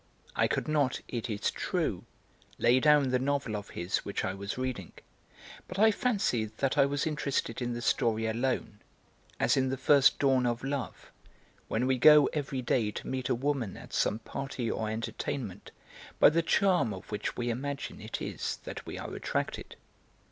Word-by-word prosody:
I - - +3
could - - -1
not, 145 -4 +1
it 120 -1 -4
is 105 -2 -1
true, - - -2 0.5
lay 125 +2 +4
down 150 -2 +5
the 125 0 +2
novel 140 -4 -1
of 105 0 -6
his 85 +2 0
which 100 - -3
I 95 - -1
was 100 +3 -5
reading, 130 -8 -4 0.7
but 185 - -7
I 220 +2 +6
fancied 195 - 0
that 135 -1 0
I 140 - +5
was 145 +2 -1
interested 140 -6 -2
in 120 0 -1
the 120 0 -5
story 110 -1 +1
alone, 115 -2 -1 0.6
as - - +3
in 130 -1 +1
the 135 - -2
first 140 +1 +5
dawn 130 -3 +3
of 120 +1 -2
love, 135 -3 -4 0.6
when 115 +3 0
we 130 -1 +1
go 150 +2 +8
every 135 -3 -2
day 115 -2 +1
to - - -7
meet 130 -1 -3
a - - +2
woman 130 -5 -2
at - - -12
some 105 - +1
party 130 0 -4
or 110 -1 -2
entertainment 110 +1 -4 0.5
by - - +8
the 165 +2 +2
charm 165 - +2
of 95 - -12
which 105 0 -3
we 120 0 -1
imagine 140 +4 -4
it - - -5
is - - -3
that - - -7
we - - -5
are - - -6
attracted. - - -3
130 Hz, 180 wpm, -30 LUFS, 115-140 Hz, 0.7 s, go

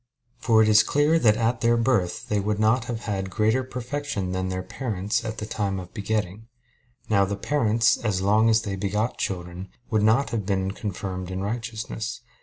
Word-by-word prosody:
For 110 -2 +4
it - - +2
is 105 0 +7
clear 145 +7 +2
that 110 -6 +4
at 115 +1 0
their 115 0 +3
birth 115 -7 0
they 105 - 0
would 105 +1 -1
not 110 +3 +2
have 115 -1 -4
had 95 -4 -3
greater 110 +7 +1
perfection 125 -5 -4
than 95 0 -2
their 95 0 -3
parents 105 -3 -2
at 110 -1 -5
the 105 - -4
time 100 -3 -2
of 90 -1 -10
begetting. 105 0 -3 0.6
Now 100 -2 +3
the 100 +1 -1
parents, 115 -3 +2
as 105 -5 -1
long 105 +4 +3
as 110 0 +3
they 100 -3 -3
begot 105 +4 -2
children, 90 0 -4 0.2
would 110 -2 +2
not 110 +6 +3
have 110 -3 -1
been 95 -1 -1
confirmed 95 -3 -5
in 95 0 -4
righteousness. 115 +1 -4
105 Hz, 190 wpm, -25 LUFS, 95-115 Hz, 0.6 s, is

